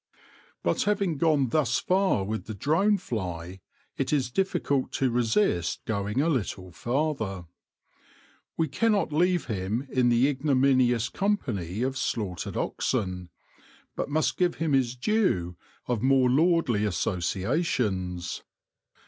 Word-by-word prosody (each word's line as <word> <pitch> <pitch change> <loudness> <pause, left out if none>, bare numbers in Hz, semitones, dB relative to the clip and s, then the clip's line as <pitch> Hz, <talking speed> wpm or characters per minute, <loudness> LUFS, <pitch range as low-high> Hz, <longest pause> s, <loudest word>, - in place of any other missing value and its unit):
But - - +1
having 200 -7 0
gone 150 -6 +3
thus 120 -3 +1
far 185 - +1
with 110 +3 -4
the 110 - -6
drone 180 - +2
fly, 95 - -5 0.4
it - - -1
is 130 -5 +1
difficult 145 -6 0
to 130 -2 +1
resist 115 - +1
going 105 +3 -1
a 155 - +1
little 100 - -2
farther. 110 - -2 1.1
We 160 - +1
cannot 205 +3 +1
leave 175 +2 +2
him 110 +4 -3
in 125 -2 +3
the 120 +3 +4
ignominious 130 -4 +2
company 115 - -2
of 130 0 -2
slaughtered 100 -8 -3
oxen, 90 -7 -2 0.7
but - - -3
must 145 -2 0
give 180 -1 +1
him 160 -2 -1
his 130 -2 +2
due 125 - 0 0.3
of 120 -4 -1
more 130 -1 +4
lordly 155 -7 +2
asso 90 -1 -1
ciations. 95 - -1
125 Hz, 125 wpm, -27 LUFS, 100-155 Hz, 1.1 s, the